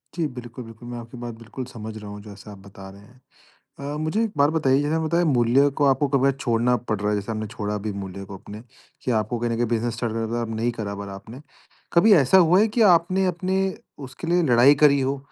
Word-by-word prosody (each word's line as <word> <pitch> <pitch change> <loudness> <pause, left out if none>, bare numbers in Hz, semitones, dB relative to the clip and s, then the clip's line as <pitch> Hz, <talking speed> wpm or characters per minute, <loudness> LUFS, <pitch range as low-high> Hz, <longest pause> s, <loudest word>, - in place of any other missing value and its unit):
जी, 170 -2 -1
बिल्कुल, 125 -2 -9
बिल्कुल, 115 +1 -12
मैं 120 - -6
आपकी 120 +2 -11
बात 120 -1 -6
बिल्कुल 115 +3 -8
समझ 110 -3 -8
रहा 105 -1 -9
हूँ 105 0 -9
जैसे 100 0 -12
आप 100 - -11
बता 95 -1 -11
रहे 100 +1 -14
हैं। 125 +5 -20 0.7
अ, - - -4
मुझे 155 +9 0
एक 225 - -2
बात 145 +1 +4
बताइए 140 -4 +2
जैसे 145 +2 -1
आपने 160 0 -1
बताया 170 +2 +1
मूल्य 130 0 +3
को 145 - +3
आपको 135 +1 +3
कभी 135 0 +3
छोड़ना 125 -2 +1 0.2
पड़ 110 - +1
रहा 105 0 -1
है 105 - +1
जैसे 100 +2 -4
हमने 110 -1 -4
छोड़ा 105 -2 -4
भी 105 - -1
मूल्य 95 +1 -8
को 95 0 -9
अपने, 105 +3 -11 0.4
कि 125 - -2
आपको 110 +1 -1
कहीं 120 0 -1
न - - 0
कहीं 120 +1 0
बिज़नेस 115 +1 -1
स्टार्ट 115 -1 -3
करना 115 0 -2
था 120 0 -1
नहीं 115 +2 0
करा 100 -2 -4
पर 100 0 -7
आपने, 100 +7 -10 0.5
कभी 195 +5 +6
ऐसा 150 +3 +5
हुआ 180 0 +5
है 215 - +4
कि - - +4
आपने 185 +3 +2
अपने 185 +2 -1 0.5
उसके 135 +6 -9
लिए 175 +1 +2
लड़ाई 130 0 +5
करी 140 -1 +6
हो, 135 +1 -1
120 Hz, 245 wpm, -23 LUFS, 110-145 Hz, 0.7 s, कभी